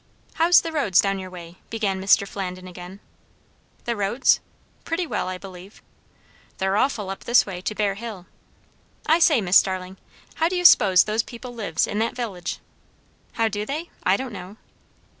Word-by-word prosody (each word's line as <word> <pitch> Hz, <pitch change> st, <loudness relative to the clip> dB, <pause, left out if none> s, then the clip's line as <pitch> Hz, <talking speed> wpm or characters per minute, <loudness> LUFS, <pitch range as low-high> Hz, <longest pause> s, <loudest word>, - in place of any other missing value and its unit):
"How's 340 Hz, +2 st, +5 dB
the 330 Hz, -, -5 dB
roads 275 Hz, -, +2 dB
down 195 Hz, -1 st, +1 dB
your 185 Hz, -1 st, -7 dB
way?" 175 Hz, -1 st, -11 dB
began 200 Hz, -4 st, -2 dB
Mr. 200 Hz, +1 st, +4 dB
Flandin 185 Hz, -2 st, -6 dB
again. 180 Hz, +2 st, -10 dB, 0.8 s
"The 235 Hz, -, -1 dB
roads? 205 Hz, +5 st, +2 dB, 0.4 s
pretty 340 Hz, +2 st, -2 dB
well, 310 Hz, -, -3 dB
I 185 Hz, 0 st, -4 dB
believe." 190 Hz, +1 st, -12 dB, 0.7 s
"They're 190 Hz, +1 st, 0 dB
awful, 210 Hz, -5 st, 0 dB
up 195 Hz, -, -8 dB
this 240 Hz, +1 st, +4 dB
way, 185 Hz, -3 st, -6 dB
to 215 Hz, -, -4 dB
Bear 205 Hz, -2 st, 0 dB
Hill. 205 Hz, -3 st, -8 dB, 0.8 s
I 320 Hz, +2 st, +4 dB
say, 305 Hz, -7 st, +4 dB
Miss 185 Hz, 0 st, +5 dB
Starling, 185 Hz, 0 st, 0 dB, 0.4 s
how 325 Hz, +1 st, +2 dB
do 365 Hz, -, -3 dB
you 355 Hz, 0 st, -2 dB
s'pose 190 Hz, -, +7 dB
those 215 Hz, +1 st, 0 dB
people 245 Hz, +2 st, -10 dB
lives, 200 Hz, -9 st, -1 dB
in 210 Hz, -, -3 dB
that 225 Hz, +1 st, -1 dB
village?" 200 Hz, -8 st, -4 dB, 0.8 s
"How 225 Hz, -, +1 dB
do 205 Hz, -1 st, -3 dB
they? 305 Hz, +9 st, -5 dB
I 190 Hz, +2 st, +2 dB
don't 260 Hz, -3 st, -6 dB
know." 195 Hz, +2 st, -9 dB
200 Hz, 175 wpm, -23 LUFS, 185-240 Hz, 0.8 s, s'pose